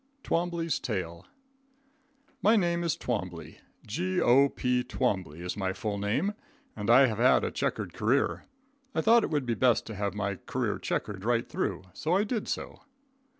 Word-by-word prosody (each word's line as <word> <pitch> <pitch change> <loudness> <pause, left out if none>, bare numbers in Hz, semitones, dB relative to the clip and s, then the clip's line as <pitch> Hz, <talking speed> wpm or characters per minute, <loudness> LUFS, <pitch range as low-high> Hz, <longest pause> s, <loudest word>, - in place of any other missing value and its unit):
Twombley's 170 -2 -1
Tale. 85 -7 -4 1.1
My 215 +3 +5
name 175 -4 +1
is 170 - 0
Twombley, 90 -8 -4 0.3
G.O.P. 130 - +2
Twombley 95 - -2
is 90 0 -4
my 95 -2 -1
full 100 +1 -3
name 120 - 0 0.4
and 105 0 -4
I 130 +3 +8
have 110 -3 -2
had 125 +2 +5
a - - -1
checkered - - -2
career. - - +1 0.5
I - - +2
thought 230 0 +5
it - - -1
would 145 -4 0
be 120 - 0
best 120 0 +2
to 110 - -7
have 100 0 -2
my 100 -2 -2
career - - -1
checked 100 -2 -3
right 120 +1 +1
through, 85 - -2
so 160 - 0
I 200 - +3
did 215 0 -2
so. - - -4
120 Hz, 160 wpm, -29 LUFS, 100-165 Hz, 1.1 s, I